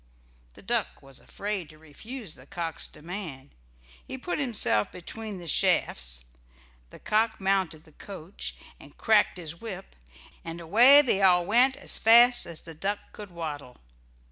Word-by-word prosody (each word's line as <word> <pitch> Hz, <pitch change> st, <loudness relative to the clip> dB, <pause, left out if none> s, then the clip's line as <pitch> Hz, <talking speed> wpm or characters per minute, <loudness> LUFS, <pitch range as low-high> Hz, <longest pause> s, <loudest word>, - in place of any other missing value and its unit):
The -, -, -15 dB
duck -, -, -2 dB
was 135 Hz, -1 st, -10 dB
afraid 200 Hz, -6 st, -5 dB
to 155 Hz, -, -16 dB
refuse 180 Hz, -, -7 dB
the 130 Hz, +2 st, -17 dB
cock's 165 Hz, -1 st, -4 dB
demand. 160 Hz, -5 st, -9 dB, 0.5 s
He 260 Hz, -, -8 dB
put 330 Hz, +7 st, -4 dB
himself 215 Hz, -, +1 dB
between 210 Hz, +3 st, -7 dB
the 175 Hz, -2 st, -10 dB
shafts, 60 Hz, -, 0 dB, 0.6 s
the -, -, -13 dB
cock 220 Hz, +1 st, 0 dB
mounted 190 Hz, -5 st, -1 dB
the 155 Hz, -, -20 dB
coach 185 Hz, +2 st, -9 dB, 0.2 s
and -, -, -17 dB
cracked 215 Hz, -4 st, +2 dB
his 170 Hz, -1 st, -9 dB
whip, 195 Hz, -4 st, -8 dB, 0.5 s
and 165 Hz, +1 st, -7 dB
away 240 Hz, -, +7 dB
they 200 Hz, -7 st, 0 dB
all 180 Hz, -2 st, +4 dB
went 245 Hz, +7 st, +4 dB
as -, -, -1 dB
fast 240 Hz, +2 st, +7 dB
as 170 Hz, -2 st, -6 dB
the 165 Hz, -, -11 dB
duck 195 Hz, +6 st, -2 dB
could 210 Hz, -2 st, -9 dB
waddle. 150 Hz, -7 st, -7 dB
180 Hz, 150 wpm, -26 LUFS, 155-220 Hz, 0.6 s, away